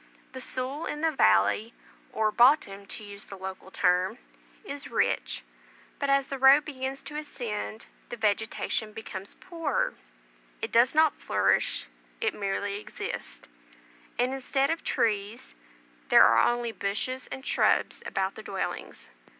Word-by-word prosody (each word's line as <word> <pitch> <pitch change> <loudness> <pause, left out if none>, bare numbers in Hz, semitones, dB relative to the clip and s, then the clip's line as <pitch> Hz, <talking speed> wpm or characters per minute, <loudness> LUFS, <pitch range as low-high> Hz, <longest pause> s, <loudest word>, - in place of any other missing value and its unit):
The 260 - -8
soil 260 +5 -3
in 295 - -4
the 325 0 +2
valley 155 - +3 0.4
(or 215 -1 +1
"bottom," 210 -5 +4
to 215 - -6
use 205 0 -8
the 195 - -9
local 190 0 -7
term) 185 +4 +2 0.5
is 285 -8 -7
rich; - - 0 0.6
but, 280 - -1
as 275 0 +4
the 275 - -4
road 270 +3 +7
begins 265 -2 -5
to 295 +2 -7
ascend, 230 -7 -5 0.2
the 240 - -6
vegetation 220 0 -1
becomes 200 -3 -7
poorer; 330 -5 -2 0.7
it - - -4
does 245 +5 +4
not 315 -1 +4
flourish, - - +1 0.3
it 450 - 0
merely 200 0 -2
exists; - - -7 0.7
and, 250 +2 +1
instead 270 +2 0
of 330 - -3
trees, 210 - -1 0.6
there - - +8
are 115 - +5
only 240 -1 -2
bushes 225 +6 -2
and 265 - -8
shrubs - - +2
about 190 0 -1
the - - -9
dwellings. 195 -2 -5
235 Hz, 140 wpm, -28 LUFS, 200-275 Hz, 0.7 s, there